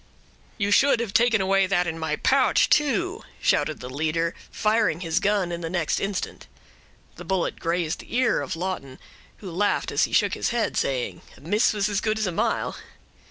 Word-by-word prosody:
"You 205 -2 0
should 275 +3 +4
have 230 -4 -3
taken 230 -3 +4
away 195 0 +2
that 180 -2 +1
in 165 -1 -4
my 160 - -1
pouch, - - +3
too," 345 +8 +1 0.2
shouted 155 -3 +1
the 125 - -6
leader, 160 +4 -1 0.2
firing 215 -6 +1
his 165 0 0
gun 200 -3 +1
in 170 0 -4
the 165 - -4
next 175 -3 0
instant. 195 -1 -4 0.7
The - - -8
bullet 190 -3 -1
grazed 165 -1 -1
the - - -8
ear 255 0 +2
of - - -4
Lawton, 165 -7 -4 0.4
who 190 -4 -8
laughed 205 +5 0
as - - +3
he - - -9
shook - - +2
his - - -1
head, 235 -1 -1
saying, 130 -3 -1 0.2
"A - - -18
miss 205 +9 +2
was 205 -1 0
as 205 -1 -1
good 215 0 0
as 215 - 0
a 185 - -1
mile." 165 - -1
190 Hz, 195 wpm, -24 LUFS, 165-215 Hz, 0.7 s, should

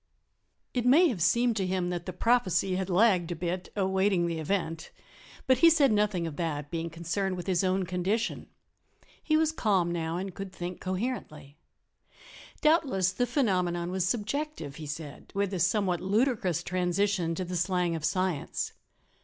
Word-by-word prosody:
It 245 - 0
may 305 +8 +6
have 205 -10 -3
seemed 235 +7 +3
to 190 -2 0
him 180 -1 -1
that 175 0 -4
the - - -2
prophecy 190 -2 +1
had 190 0 -2
lagged 180 -3 +3
a - - -7
bit, 180 +2 -3
awaiting 190 -2 +2
the 165 -1 -2
event, 165 -1 -2 0.6
but 260 -1 +3
he 335 - +8
said 295 -6 +4
nothing 205 -5 +1
of 160 -3 -6
that, 150 -4 -3
being 165 0 -3
concerned 170 +4 -2
with 175 - -6
his 185 -1 +1
own 185 0 +1
condition. 185 +5 -2 0.7
He 310 -1 +2
was 315 0 +2
calm 195 - +1
now, 165 -1 -2
and 190 0 -4
could 195 0 -7
think 175 0 -6
coherently. 185 - -4 1.0
"Doubtless 275 - +3
the 245 +6 -1
phenomenon 180 - 0
was 185 -1 0
subjective," 215 - -3
he 155 -2 -7
said, 150 -1 -8
with 200 -1 0
a 185 - -2
somewhat 180 0 +1
ludicrous 205 - +1
transition 180 -1 0
to 185 - -3
the 180 +1 -5
slang 180 0 +1
of 160 - -5
science. 185 -2 -1
185 Hz, 165 wpm, -29 LUFS, 170-210 Hz, 1.0 s, he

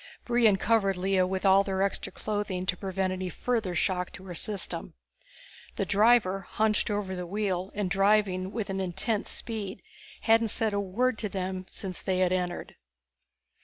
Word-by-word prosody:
Brion 235 -4 +4
covered 195 -3 +2
Lea 190 +1 +2
with 185 +1 -1
all 195 +1 +6
their 195 -1 0
extra 200 - -2
clothing 205 -4 -3
to 185 - 0
prevent 190 0 -2
any 185 0 -3
further 220 -2 -1
shock 180 +1 0
to 185 - -10
her 180 - -6
system. 185 - -3 0.8
The - - -1
driver, 205 -2 +4
hunched 215 +4 0
over 205 -2 -2
the 180 -1 -5
wheel 190 -1 -1
and 205 -2 0
driving 195 -1 +2
with 215 -3 -3
an 195 - -2
intense 195 +4 0
speed, 205 -5 -4 0.4
hadn't 225 0 +4
said 220 0 0
a 200 - +1
word 215 +5 0
to 210 - -2
them 185 -1 -4
since 185 -3 -5
they 185 -1 0
had 185 -1 +2
entered. 180 -1 -2
195 Hz, 165 wpm, -28 LUFS, 185-210 Hz, 0.8 s, all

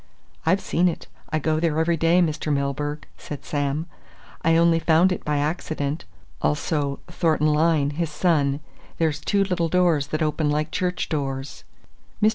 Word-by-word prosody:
I've 185 +4 +3
seen 175 +2 +1
it 170 - -3 0.3
I 155 - +1
go 155 +1 0
there 160 -2 0
every 170 +1 +2
day, 165 +3 +4
Mr. 155 -1 -1
Milburgh," 145 +1 -2
said 145 - -8
Sam. 145 +2 -1 0.6
"I 165 0 +3
only 165 0 +4
found 165 +3 +4
it 180 - -3
by 150 -1 0
accident. 150 0 -2 0.4
'Also 140 - 0
Thornton 155 -3 +1
Lyne, 150 -2 +2
his 165 +2 -2
son.' 150 -3 +1 0.4
There's 155 -3 +1
two 200 +5 +2
little 180 -4 0
doors 170 -5 +2
that 155 +1 -1
open 155 0 0
like 150 +1 0
church 180 -1 -1
doors." 135 -2 -4 0.5
Mr. 215 - +5
155 Hz, 160 wpm, -24 LUFS, 145-170 Hz, 0.6 s, Mr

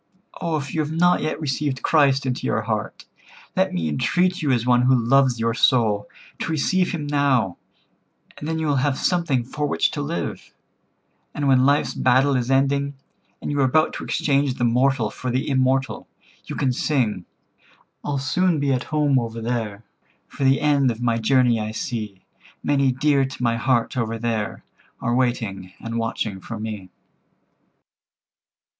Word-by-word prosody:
"Oh, 165 -2 0
if 140 -2 -6
you 160 - -1
have 150 0 -3
not 175 +2 +3
yet 155 - -2
received 140 -2 -2
Christ 140 -3 +3
into 130 -1 -2
your 110 - 0
heart, 110 -1 -4 0.5
let - - +2
me 85 -3 -2
entreat 175 - +1
you 150 - 0
as 120 -2 +1
one 125 -1 +4
who 130 +1 +4
loves 125 +1 +3
your 115 0 +1
soul, 110 -4 +2 0.3
to - - -3
receive 180 +4 +1
Him 160 -5 -4
now; 140 -10 +1 0.8
and 150 - -7
then 160 0 -1
you 160 - -2
will 145 -2 +1
have 135 0 +1
something 170 -9 +1
for 145 +4 -3
which - - +1
to 145 - -4
live, 155 +4 -5 0.8
and 145 -1 -1
when 130 -1 +4
life's 145 +1 +2
battle 130 +2 +3
is 125 -1 -1
ending, 140 +1 +1 0.5
and - - -3
you 145 - -1
are - - +4
about 155 +5 +2
to - - -6
exchange 140 -2 0
the 120 - -3
mortal 125 -1 +2
for 130 - -5
the 130 +2 -1
immortal, 130 -1 0 0.4
you - - -6
can 130 -2 0
sing— 120 - 0 0.8
'I'll 145 -1 -2
soon 165 +5 +1
be 140 -1 +1
at 130 0 -2
home 150 -3 +2
over 115 -1 -4
there, 115 -3 -3 0.4
For 140 - -6
the 135 +1 +3
end 145 -3 +3
of 115 0 -4
my 115 -1 +1
journey 120 0 +3
I 105 0 -3
see; 110 -5 -5 0.4
Many 140 -2 +2
dear 140 +2 +2
to 135 -1 -5
my 115 -1 +2
heart 120 0 +1
over 115 -2 -2
there 110 -3 -3 0.4
Are 120 - -1
waiting 115 -7 -1
and 115 0 -4
watching 110 -3 -3
for 110 +3 -7
me.'" 105 -4 -6
130 Hz, 175 wpm, -22 LUFS, 115-145 Hz, 0.8 s, one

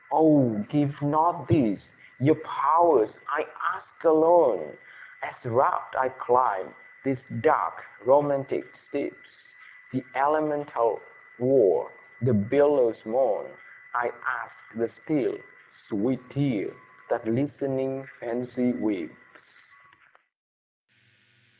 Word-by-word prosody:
Oh! 145 -8 +5
give 145 -1 0
not 155 +4 +1
these, 100 -4 +1 0.3
ye 145 +5 +5
pow'rs! 160 -5 +3
I - - -1 0.3
ask - - -16
alone, 165 +1 +5 0.5
As - - -7
rapt - - +1
I 130 0 +1
climb 130 -1 +1 0.3
these 135 -1 -2 0.2
dark - - +1 0.2
romantic 140 -1 +2
steeps, - - -8 0.6
The 130 - -3
elemental 145 -3 0 0.4
war, 450 - +3 0.3
the 130 +1 +1
billow's 120 +2 +3
moan; 120 +4 0 0.4
I - - -1
ask - - -4 0.2
the 115 0 -3
still, 155 -3 -2 0.5
sweet 125 +4 -2
tear, 140 0 -1 0.4
that 115 -1 -2
listening 135 +1 -2
Fancy 125 +1 -2
weeps! 105 -3 -6
135 Hz, 90 wpm, -26 LUFS, 125-150 Hz, 0.6 s, Oh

